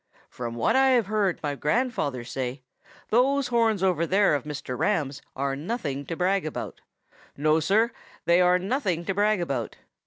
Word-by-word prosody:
From 120 -1 -5
what 115 - +1
I 265 0 +5
have 230 - +1
heard 205 -3 0
my 145 -1 -1
grandfather 150 - -1
say, 130 +1 -5 0.5
those 260 +3 +2
horns 225 -5 +2
over 170 -3 +2
there 195 -1 +3
of 145 -1 -1
Mr. 145 -4 -5
Ram's 145 -4 -1
are 135 0 -1
nothing 145 - -4
to 165 - -3
brag 190 +3 +1
about. 155 - -6 0.6
No, 155 +2 +3
Sir, 215 +8 +2 0.3
they 170 +1 +4
are 180 0 +5
nothing 185 - -1
to 195 - -1
brag 210 +1 +2
about. 135 -9 -3
180 Hz, 165 wpm, -26 LUFS, 140-215 Hz, 0.6 s, I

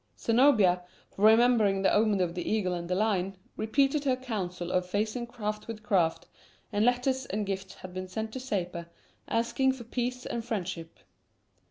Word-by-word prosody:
Zenobia, 225 -7 +4 0.3
remembering 215 -2 +4
the 190 - +4
omen 210 -2 +3
of 175 -2 0
the 175 0 -3
eagle 200 -4 +1
and 170 0 -4
the 180 - +1
lion, 195 -2 0 0.2
repeated 275 +6 +1
her 265 -3 +2
counsel 185 -9 -4
of 180 0 +2
facing 215 +5 -1
craft 210 -3 -4
with 220 -2 -7
craft, 180 -6 +1 0.5
and 205 +1 +2
letters 250 +2 +1
and 210 +1 -2
gifts 190 -1 -4
had 185 -1 -10
been 185 0 -5
sent 220 +3 -4
to 260 - -5
Sapor, 180 -8 -3 0.4
asking 235 +3 +1
for 260 -2 -9
peace 250 +2 -3
and 235 - -3
friendship. 185 -7 -4
215 Hz, 165 wpm, -29 LUFS, 185-240 Hz, 0.5 s, Zenobia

